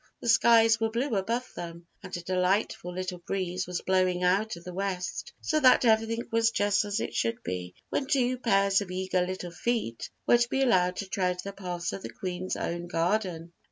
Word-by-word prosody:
The 240 - -3
skies 225 -1 +6
were 225 0 +1
blue 235 +2 -1
above 230 +6 -2
them 170 0 -7 0.2
and 185 -2 -6
a - - -6
delightful 180 0 0
little 180 0 -4
breeze 185 0 -3
was 180 -1 -3
blowing 185 -1 +1
out 195 +4 +2
of 170 - -12
the 180 - -8
west; 190 -1 -3
so 310 - +1
that 255 -2 +6
everything 225 +1 +2
was 225 0 +3
just 205 -1 +1
as 205 +1 -1
it - - -3
should 115 0 -1
be 90 0 -5
when 270 - -1
two 255 -2 +1
pairs 195 -4 +3
of 200 - -6
eager 185 0 0
little 180 -1 -5
feet 200 - -2 0.2
were 240 - +5
to 235 0 +1
be 270 +1 +1
allowed 180 -7 +3
to 200 - -4
tread 180 -2 -1
the 200 - -6
paths 180 -3 -4
of 195 - -5
the - - -6
Queen's 185 0 -4
own 170 +1 -3
garden. 170 -1 -1
190 Hz, 200 wpm, -28 LUFS, 180-225 Hz, 0.2 s, skies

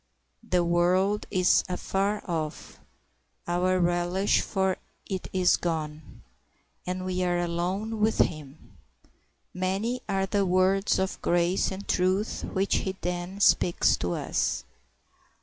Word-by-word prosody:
The 185 -6 +1
world 180 +4 +2
is 185 -2 +3
afar 195 +3 -1
off, 160 -4 -4 0.7
our 180 +1 +1
relish 175 +3 +2
for 190 -2 0 0.3
it 190 -2 -4
is 185 -1 +3
gone, 155 - -4 0.6
and 185 0 -3
we 185 0 -1
are 175 -1 +1
alone 180 +6 -2
with 215 +1 +2
Him. 150 -2 -2 0.8
Many 195 +7 -1
are 195 0 +1
the 200 +1 +1
words 190 +2 +2
of 190 0 -2
grace 175 +2 +1
and 195 +1 -7
truth 185 +4 0
which 195 0 0
he 190 0 -3
then 180 +2 -4
speaks 175 -3 +4
to 90 0 -2
us. - - -1
185 Hz, 120 wpm, -27 LUFS, 175-195 Hz, 0.8 s, speaks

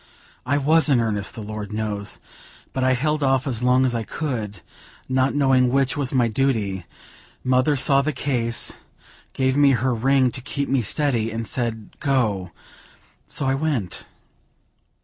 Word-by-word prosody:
I 140 +2 +2
was 155 +3 +3
in 135 -4 +4
earnest, 105 -3 -2
the 110 - -6
Lord 105 0 -6
knows! 105 -2 -4 0.5
but 130 - -1
I 130 0 +3
held 150 +4 0
off 135 -2 +2
as 125 -5 -2
long 125 +1 +3
as 125 - 0
I 115 - -1
could, 110 - -4 0.5
not 130 +1 +1
knowing 130 -3 +3
which 135 +3 +1
was 140 -3 -1
my 125 -3 +2
duty; 110 -7 -1 0.6
mother 130 +3 +2
saw 140 +1 +4
the 155 +2 -1
case, 125 -4 0 0.6
gave 130 0 +1
me 140 -1 +5
her 130 0 +1
ring 130 +2 +2
to 130 - -5
keep 140 +3 -3
me 135 -2 +1
steady, 120 -1 0
and 115 0 -4
said 115 -3 -3
'Go:' 110 - 0 0.8
so 140 - -3
I 135 - +2
went." 135 - -2
130 Hz, 160 wpm, -22 LUFS, 115-135 Hz, 0.8 s, me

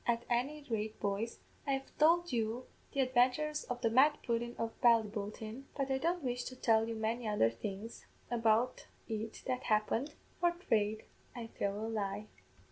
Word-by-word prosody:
At 235 0 +1
any 280 +5 0
rate, 220 -2 -2
boys, 205 +3 -2 0.3
I 275 - +2
have 270 0 -4
tould 340 +2 +5
you 230 +2 -1 0.3
the 275 - +1
adventures 260 +4 +2
of 245 -1 -4
the 230 - +3
Mad 290 +5 +6
Pudden 235 0 -1
of 230 0 -2
Ballyboulteen; 220 +1 +1
but 275 -1 0
I 265 - +2
don't 340 +3 0
wish 245 -1 -1
to 255 - -6
tell 225 -2 +3
you 230 - -3
many 225 +2 -1
other 205 - +3
things 200 - -6 0.2
about 230 +1 +2 0.2
it 220 0 -4
that 255 -1 -2
happened 225 +6 +1 0.2
for 345 0 +3
fraid 220 - 0 0.3
I'd 230 -2 -7
tell 200 0 0
a 215 - -3
lie." 210 -1 -2
235 Hz, 170 wpm, -34 LUFS, 220-265 Hz, 0.3 s, Mad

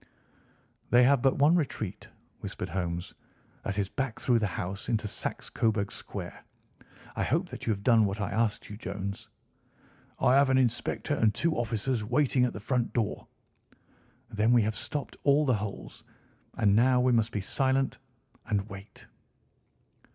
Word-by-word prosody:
"They 120 +1 +6
have 135 0 +4
but 135 0 +3
one 145 +4 +5
retreat," 130 - -2 0.3
whispered 90 - -5
Holmes. 85 -1 -3 0.5
"That 100 - -4
is 100 -2 +1
back 135 +1 -3
through 120 -2 +2
the 105 - 0
house 95 +3 -5
into 110 -3 0
Saxe - - -5
Coburg 110 -3 0
Square. - - -8 0.7
I - - -2
hope - - 0
that - - -8
you - - +3
have 100 -1 -3
done 115 -3 +5
what 100 +1 -2
I 100 - -2
asked 110 +1 0
you, 105 - -8
Jones?" 100 -1 -5 0.9
"I 125 - +4
have 140 0 +5
an 130 - +4
inspector 125 +3 0
and 115 -6 +3
two 165 +6 +1
officers 115 0 -1
waiting 125 +2 +2
at 125 - -2
the - - -6
front 120 +3 -1
door." 115 -4 -2 1.0
"Then 110 +1 +2
we 120 -2 +5
have 110 +1 -1
stopped 145 +6 -5
all 145 +1 +4
the 130 - +3
holes. 100 -1 -7 0.5
And 100 -2 +3
now 125 +3 +4
we 125 0 +3
must 115 -1 +2
be 105 - -2
silent 135 +5 0 0.5
and 105 -3 0
wait." 100 +1 -11
115 Hz, 165 wpm, -29 LUFS, 100-130 Hz, 1.0 s, They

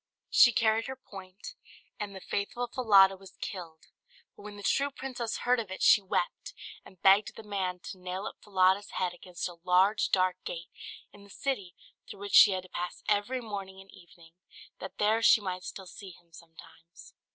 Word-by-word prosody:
She 240 - +7
carried 225 -2 +1
her 265 - -5
point, 195 - -11 0.5
and 205 -1 -5
the 190 - -9
faithful 205 +6 -3
Falada 200 -6 +5
was 190 0 -16
killed; 165 -4 -7 0.5
but - - -15
when 205 0 -10
the 205 - -10
true 280 +6 +1
princess 255 -4 -5
heard 250 0 +2
of 220 -4 -5
it 190 - -5
she 210 - +7
wept, 185 -2 -3 0.3
and 185 - -17
begged 195 +2 +4
the 225 - -10
man 190 -3 -3
to 185 - -9
nail 185 +2 -5
up - - -7
Falada's 195 0 +2
head 180 -1 -1
against 175 0 -6
a 175 -1 -11
large 185 +4 +3
dark 185 -1 +2
gate 170 0 -7 0.4
in 200 - -15
the 200 - -17
city 200 -7 -4 0.3
through 200 - -10
which 200 -1 -7
she - - +9
had 185 -2 -2
to 185 - -16
pass 175 0 -5
every 215 +5 0
morning 195 -4 -7
and 195 0 -15
evening, 170 -1 -18 0.5
that - - -9
there 215 +2 +2
she 225 - +6
might 185 -3 -5
still 190 - -8
see 190 +2 -11
him 170 -1 -19
sometimes. 165 0 -16
195 Hz, 190 wpm, -29 LUFS, 185-210 Hz, 0.5 s, she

